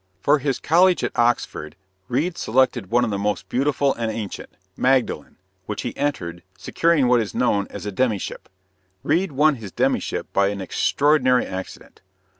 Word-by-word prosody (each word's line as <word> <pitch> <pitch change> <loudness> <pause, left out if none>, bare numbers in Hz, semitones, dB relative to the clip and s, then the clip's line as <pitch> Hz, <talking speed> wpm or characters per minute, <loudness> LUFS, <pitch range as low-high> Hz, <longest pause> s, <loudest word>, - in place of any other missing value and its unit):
For 145 +9 +3
his 135 -1 -1
college 180 +3 +3
at - - -2
Oxford, 115 -10 0 0.3
Reade 150 +8 -1
selected 125 - +1
one 120 +2 +3
of 110 - -3
the 100 - -2
most 105 +1 -2
beautiful 140 +1 +1
and 115 -1 -3
ancient 105 -3 -6 0.3
Magdalen 130 -1 0 0.3
which - - -4
he - - -4
entered, 115 -13 -3 0.2
securing 165 - +1
what 120 -1 +4
is 105 - -5
known 100 -5 +1
as - - -8
a 105 - -3
demyship. 105 -1 -2 0.5
Reade 170 +4 +1
won 150 +1 +3
his 105 -5 -9
demyship - - -1
by 100 0 +3
an 100 0 -3
extraordinary 130 +6 +2
accident. 95 0 -8
125 Hz, 160 wpm, -22 LUFS, 105-145 Hz, 0.5 s, what